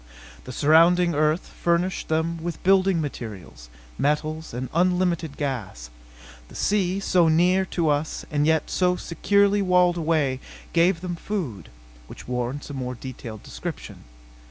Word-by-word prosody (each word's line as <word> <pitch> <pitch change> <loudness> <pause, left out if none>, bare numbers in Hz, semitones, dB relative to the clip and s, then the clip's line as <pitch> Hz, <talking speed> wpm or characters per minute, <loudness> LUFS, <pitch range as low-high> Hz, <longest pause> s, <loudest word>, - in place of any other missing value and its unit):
The - - -7
surrounding 170 +3 +4
earth 155 +3 +1
furnished 175 +2 -1
them 160 +1 -1
with 170 0 -5
building 190 -1 +4
materials, 100 - -7 0.3
metals 155 +2 -1
and 125 +2 -4
unlimited 175 -3 +1
gas. 105 - -4 0.6
The - - -15
sea, 195 -2 +1
so 180 -3 +3
near 180 +4 +3
us 155 -1 0
and 150 0 +1
yet 160 0 +1
so 180 -1 +2
securely 200 +4 +2
walled 180 -2 +3
away, 155 -5 0 0.3
gave 170 0 +3
them 180 -1 -4
food. 160 - -5 0.4
Which - - -11
warrants 125 +4 -3
a - - -6
more 125 -2 -4
detailed 115 -4 -8
description. - - -8
160 Hz, 130 wpm, -24 LUFS, 140-180 Hz, 0.6 s, surrounding